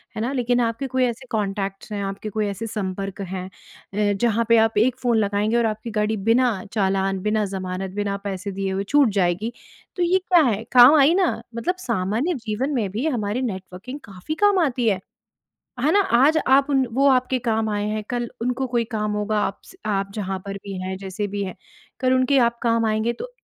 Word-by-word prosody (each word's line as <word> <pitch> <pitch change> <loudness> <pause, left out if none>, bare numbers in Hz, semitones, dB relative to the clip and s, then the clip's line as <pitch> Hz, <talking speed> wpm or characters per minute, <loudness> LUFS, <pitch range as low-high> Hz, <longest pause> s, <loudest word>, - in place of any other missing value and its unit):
है 215 - -3
ना? 240 +4 -1
लेकिन 245 -2 +1
आपके 230 +3 -1
कोई 260 0 0
ऐसे 240 +1 -4
कॉन्टैक्ट्स 195 -1 -3
हैं, 205 -1 -3
आपके 195 +2 -4
कोई 215 0 -1
ऐसे 205 +3 -4
संपर्क 195 -2 -4
हैं 185 -1 -5
अ, 205 +2 -4
जहाँ 230 -1 +2
पे 230 - +6
आप 225 -1 +3
एक 240 +4 +3
फ़ोन 240 -2 +2
लगाएँगे 210 +2 +1
और 235 - +2
आपकी 220 +1 -3
गाड़ी 215 0 0
बिना 245 0 +4 0.2
चालान, 195 -2 +1
बिना 210 +1 +1
ज़मानत, 190 -1 -4
बिना 205 -1 -1
पैसे 195 0 -4
दिए 195 0 -3
हुए 190 +1 -1
छूट 280 +4 +4
जाएगी। 185 +6 0 0.4
तो 360 - 0
ये 360 +2 +3
क्या 350 -3 +6
है, 225 -5 0
काम 250 +4 +9
आई 285 +4 +6
ना? 365 -11 +1
मतलब 235 +11 -1
सामान्य 230 - -1
जीवन 235 +6 -1
में 215 -6 0
भी 230 +10 -1
हमारी 230 -4 -1
नेटवर्किंग 195 +3 -6
काफ़ी 195 +10 -6
काम 405 -2 +4
आती 245 -4 -1
है। 195 -3 0 0.8
है 285 +5 +2
ना? 405 - +5
आज 285 -2 +4
आप 275 +2 +5
उन 270 -1 +3
वो 275 +4 +3
आपके 255 -1 +2
काम 225 -2 0
आए 205 0 -1
हैं 215 0 -2
कल 240 -1 -1 0.2
उनको 250 +2 -1
कोई 240 -1 0
काम 210 -1 -1
होगा, 210 +1 -1
आप 195 - -2
स - - -15
आप 195 -2 -1
जहाँ 195 -3 -3
पर 200 - -4
भी 200 - -6
हैं, 190 0 -4
जैसे 195 +2 -4
भी 200 - -1
हैं 185 - -6 0.5
कल 255 0 +2
उनके 255 +2 +3
आप 235 0 -2
काम 230 -1 +2
आएँगे। 220 +2 +1
तो 485 - -8
220 Hz, 210 wpm, -23 LUFS, 200-250 Hz, 0.8 s, काम